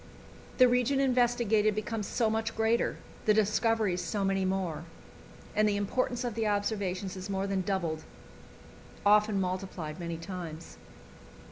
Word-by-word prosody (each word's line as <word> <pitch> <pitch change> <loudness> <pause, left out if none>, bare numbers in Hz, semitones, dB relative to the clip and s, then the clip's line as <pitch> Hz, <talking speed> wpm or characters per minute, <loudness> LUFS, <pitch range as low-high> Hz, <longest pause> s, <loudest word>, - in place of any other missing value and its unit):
The 255 - +8
region 250 +2 +2
investigated 240 -5 +3
becomes 215 -1 -3
so 230 - +1
much 225 +1 -1
greater, 225 +1 +1 0.3
the 215 - +4
discoveries 215 -3 +2
so 195 +4 -1
many 195 0 +1
more, 180 -5 -2 0.7
and 215 0 +4
the 205 - 0
importance 245 +4 -1
of 240 -2 -2
the 225 0 -1
observations 200 -2 -1
is 185 +1 -7
more 195 0 -1
than 195 -1 0
doubled, 175 -5 -2 1.0
often 210 0 +5
multiplied 185 -3 -3
many 170 -1 -4
times. 170 -2 -7
205 Hz, 135 wpm, -30 LUFS, 185-225 Hz, 1.0 s, The